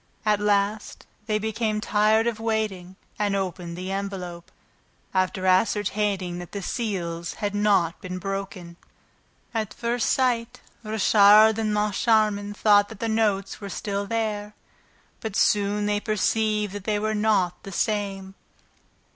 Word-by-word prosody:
At 210 -1 +3
last, 205 +1 0 0.2
they 215 -1 +1
became 220 0 -1
tired 215 +1 +2
of 235 -2 -1
waiting 215 -5 -2 0.2
and 205 -1 +1
opened 180 -3 -4
the 185 +1 -5
envelope, 190 -3 -5 0.6
after 185 0 0
ascertaining 190 -1 +1
that 175 - -10
the 200 -2 -4
seals 175 -7 -3
had 205 -1 -3
not 200 -5 +2
been 185 -2 -5
broken. 195 -3 -5 0.8
At 215 -3 -3
first 235 0 0
sight, 245 -1 0 0.2
Richard 215 0 +5
and 215 -1 0
Moncharmin 210 0 +1
thought 205 -1 +4
that 220 - -11
the 230 - -2
notes 215 -3 0
were 200 - -6
still 200 +1 -3
there; 210 -2 -2 0.6
but 220 -4 -5
soon 205 0 +2
they 205 0 +1
perceived 215 -1 0
that 205 -1 -7
they 215 -1 +1
were 215 +1 -1
not 210 -5 +1
the 195 - -9
same. 195 -1 -2
205 Hz, 135 wpm, -25 LUFS, 195-215 Hz, 0.8 s, Richard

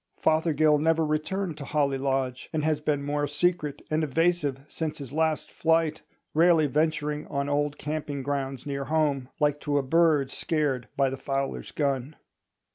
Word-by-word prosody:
Fothergill 155 -1 +3
never 160 +1 +2
returned 155 +3 -2
to - - -5
Holly 140 -2 +1
Lodge, 135 -2 -1
and 155 -2 -1
has 155 -1 +1
been 145 -2 0
more 145 0 -1
secret 150 0 0
and 155 +1 +2
evasive 155 -2 +1
since 155 -1 -4
his 140 -2 -8
last 160 0 0
flight, 160 -1 +1 0.3
rarely 165 -1 +5
venturing 150 +1 0
on 140 -1 -2
old 145 0 0
camping 145 -2 -4
grounds 135 -1 -3
near 140 -1 -3
home, 145 -3 0
like 145 -1 +2
to 145 -1 0
a 140 - +1
bird 150 -2 +3
scared 145 -6 -1
by 135 -1 +3
the 135 - -4
fowler's 135 0 -3
gun. 140 0 -1
150 Hz, 160 wpm, -27 LUFS, 140-155 Hz, 0.3 s, rarely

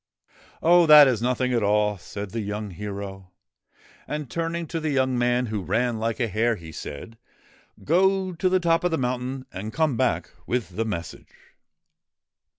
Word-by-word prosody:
' - - -28
Oh! 175 0 +6
that 150 -2 +10
is 120 -4 0
nothing 125 +1 0
at 120 - +2
all,' 105 0 +2
said 100 +2 -7
the 115 - -3
young 105 0 -4
hero. 100 0 -7 0.8
And, 150 -3 -5
turning 170 0 -2
to 165 +1 -4
the 140 -4 +1
man 125 -1 +1
who 110 -3 -3
ran 115 +4 0
like 115 0 -2
a 120 - +1
hare, 115 +3 +1
he 85 -5 -11
said: 80 +9 -8 0.3
' - - -29 0.3
Go 190 +3 +2
to 185 +2 0
the 185 0 +3
top 165 -1 +2
of 180 - +2
the 165 - 0
mountain 130 +1 -3
and 105 +4 -5
come 155 -5 0
back - - 0 0.2
with 120 -6 -1
the 115 - -1
message.' 85 -6 -6
125 Hz, 175 wpm, -24 LUFS, 105-155 Hz, 0.8 s, that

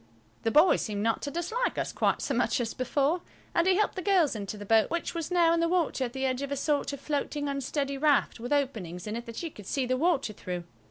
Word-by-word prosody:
The 225 - +1
boy 305 +10 +6
seemed 205 -2 -3
not 225 0 +1
to 285 - -3
dislike 350 +11 -1
us - - -2
quite - - +1
so - - -1
much - - +1
as 230 -2 -2
before, 285 +6 0 0.3
and 340 +2 +2
he 375 - +5
helped 425 +2 +1
the 375 - -3
girls 355 - +3
into 205 0 -5
the 205 - -8
boat, 220 +1 +4
which 340 0 -2
was 330 -2 -3
now 345 -2 +4
in 335 - +2
the 335 0 +2
water 335 -7 +1
at 240 - -6
the 265 0 -2
edge 260 0 0
of 280 0 -4
a 280 - -1
sort 290 +1 0
of 280 - -6
floating, 290 0 -2
unsteady 275 0 -2
raft, 290 -4 +2
with 245 +3 -6
openings 220 - -1
in 210 +1 -4
it 235 0 -6
that 230 +8 -6
you 330 - -4
could 205 -7 -12
see 270 -2 0
the 255 +1 0
water 285 -7 +1
through. 180 -3 -5
280 Hz, 260 wpm, -29 LUFS, 230-330 Hz, 0.3 s, boy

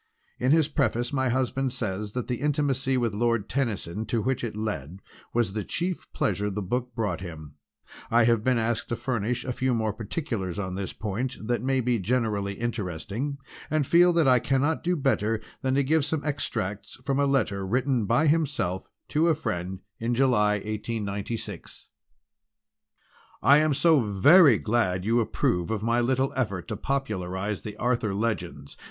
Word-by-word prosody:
In 130 +2 +2
his 160 -2 +4
preface 120 -4 0
my 130 -2 +1
husband 130 +1 0
says 105 -2 -3
that 125 -2 -3
the 125 -1 -3
intimacy 135 -3 +1
with 120 -4 0
Lord 115 -1 0
Tennyson 110 -5 -2
to 115 +1 0
which 130 -1 -1
it 115 -3 -3
led 95 -6 -4 0.3
was 115 -5 0
the 105 -1 -2
chief 175 - -3
pleasure 105 -8 0
the 105 +1 -3
book 125 +5 -3
brought 110 -5 -1
him. 80 -5 -8 0.6
I 120 +1 +5
have 115 -2 +3
been 130 0 +2
asked 115 0 -1
to 120 - 0
furnish 120 0 -2
a 130 - -2
few 130 0 0
more 110 -2 0
particulars 110 - -4
on 95 -2 -3
this 95 0 -4
point 110 +5 -3
that 120 +1 0
may 130 +1 +1
be 120 -1 +1
generally 105 -2 0
interesting, 115 - -3 0.3
and 155 -1 +1
feel 175 +4 +5
that 165 -4 +3
I 125 -1 +6
cannot 140 +6 0
do 180 +1 +1
better 115 -7 +1 0.2
than 130 0 0
give 155 +2 +3
some 150 +1 -2
extracts 105 -9 -3
from 135 0 +1
a 140 - +3
letter 105 -8 +1
written 125 +2 0
by 120 +9 +3
himself 145 - 0 0.2
to 155 +3 +2
a 165 - +4
friend 95 - -4 0.2
in 115 +1 0
July 115 -5 +3
1896. 105 -1 -4 1.5
"DEAR, - - -2
"I 140 +2 +8
am 155 -2 +2
so 155 +1 +5
very 120 - +6
glad 100 -5 0
you 115 +2 +3
approve 90 -5 0
of 110 -2 -2
my 115 +1 +2
little 130 +2 +1
effort 100 -9 -2
to 110 - -2
popularise 100 -6 -2
the 105 -1 -7
Arthur 120 -4 0
Legends. 90 -10 -3
120 Hz, 170 wpm, -26 LUFS, 105-135 Hz, 1.5 s, I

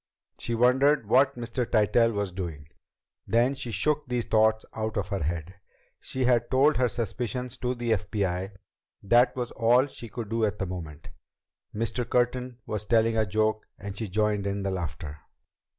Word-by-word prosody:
She 120 - -2
wondered 125 +1 +3
what 130 +5 +4
Mr. 120 +1 -3
Tytell 115 +1 +3
was 100 -3 -2
doing. 85 -6 -6 0.6
Then 120 +4 +3
she 130 -3 -5
shook 140 +8 0
these 125 -2 -1
thoughts 110 0 +3
out 110 0 -3
of 95 -2 -2
her 100 -2 -2
head. 85 +3 -3 0.5
She 130 -1 -3
had 120 -2 +2
told 140 +4 +4
her 125 -1 +3
suspicions 120 +2 -4
to 125 0 -2
the 120 -1 -2
FBI. 95 -1 -1 0.5
That 120 +5 +4
was 125 -2 -3
all 120 +3 +4
she 120 -4 -8
could 115 -3 -6
do 115 0 0
at 105 -1 0
the 95 - -2
moment. 85 -5 -7 0.6
Mr. 115 +2 -2
Curtin 125 0 0
was 105 -1 -3
telling 115 0 +3
a 110 -1 +2
joke, 110 +2 0
and 100 0 -7
she 110 0 -4
joined 105 +1 0
in 100 0 -2
the 100 - -1
laughter. 80 -4 -5
110 Hz, 170 wpm, -27 LUFS, 100-125 Hz, 0.6 s, what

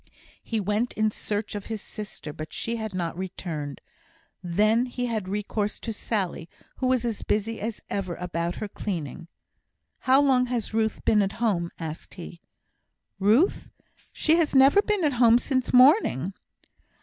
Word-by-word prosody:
He 225 - -2
went 210 +4 0
in 215 0 +1
search 205 0 -3
of 205 -1 -6
his 220 -1 -3
sister, 205 -8 -7
but 155 +1 -7
she 230 0 -3
had 220 -3 -5
not 170 -3 -2
returned. 170 -6 -5 0.6
Then 215 +7 +2
he 245 0 -3
had 220 -5 -2
recourse 210 +1 -2
to 225 - -4
Sally, 195 -6 -3 0.3
who 255 - 0
was 255 -2 +2
as 230 -3 -2
busy 220 +2 -1
as 220 +1 -4
ever 185 -4 -3
about 170 -1 -3
her 215 - -4
cleaning. 170 -6 -5 0.7
"How 260 +1 +4
long 260 -3 +3
has 240 -4 -2
Ruth 220 -1 0
been 210 -1 +4
at 195 0 0
home?" 195 -8 0
asked 160 -1 -7
he. 175 -2 -9 0.8
"Ruth! 220 - +3 0.4
She 320 +1 +3
has 320 -4 +1
never 270 +9 +7
been 420 -3 0
at 295 -3 +2
home 235 -1 +7
sin' 260 +1 0
morning. 250 - +5
215 Hz, 160 wpm, -26 LUFS, 185-245 Hz, 0.8 s, never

